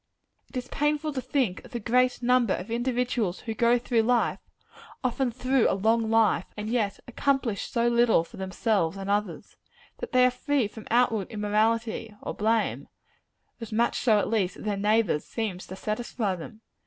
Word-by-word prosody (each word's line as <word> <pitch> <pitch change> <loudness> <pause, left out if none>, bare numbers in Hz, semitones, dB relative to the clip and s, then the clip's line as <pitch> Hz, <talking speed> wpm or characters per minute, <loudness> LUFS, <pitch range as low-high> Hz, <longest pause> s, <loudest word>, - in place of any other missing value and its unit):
It - - -7
is 250 0 -4
painful 295 +1 0
to 260 - -2
think 250 -9 -1
of - - -15
the 240 - -2
great 250 +3 +1
number 245 -4 +3
of 195 +5 -7
individuals 240 -5 -1
who 225 - -4
go 235 +2 +3
through 240 -1 +1
life 240 +1 +1 0.6
often 255 +1 0
through 255 +1 +1
a - - +1
long 220 +2 +2
life 220 -5 +3
and 210 0 -4
yet 215 -5 0
accomplish 250 -4 -1
so 235 0 +1
little 235 -7 +4
for - - -14
themselves 190 -2 0
and 195 +1 -3
others. 210 +1 -2 0.4
That - - -6
they 255 0 +5
are 250 - +4
free 265 -1 0
from 215 +1 -11
outward 225 -4 +2
immorality 220 +1 0
or - - -4
blame 225 +2 0 0.7
as 230 -1 -8
much 230 +2 +1
so 220 -4 +4
at 205 - +1
least 200 -5 0
as - - -10
their 210 -1 0
neighbors 210 -5 +1
seems 205 -5 -4
to 190 - -7
satisfy 215 0 -2
them. 215 +6 -10
225 Hz, 180 wpm, -27 LUFS, 210-245 Hz, 0.7 s, they